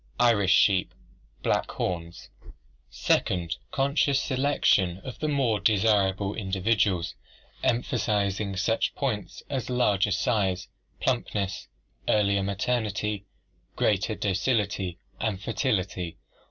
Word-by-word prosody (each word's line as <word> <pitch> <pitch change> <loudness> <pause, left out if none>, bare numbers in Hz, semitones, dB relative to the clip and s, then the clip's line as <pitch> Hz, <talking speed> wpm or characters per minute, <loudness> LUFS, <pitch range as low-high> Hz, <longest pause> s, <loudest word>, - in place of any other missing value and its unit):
Irish 110 -6 +4
sheep, 95 -2 +4 0.5
black - - +1
horns. 85 -1 -4 0.6
Second, 85 -2 0
conscious 140 0 +2
selection 130 -10 +2
of 125 -3 -8
the 155 - -1
more 135 -8 +1
desirable 100 -1 +2
individuals, 95 -2 0 0.5
emphasizing 105 -5 0
such 115 +4 0
points 120 -8 -3
as 130 -5 -3
larger 105 -6 +2
size, 100 -3 0 0.3
plumpness, 105 -6 -1 0.4
earlier 100 -2 +3
maturity, 105 0 -1 0.5
greater 105 +1 +1
docility, 100 -3 0 0.2
and 105 -4 -1
fertility. 95 -6 -1
105 Hz, 90 wpm, -27 LUFS, 95-120 Hz, 0.6 s, Irish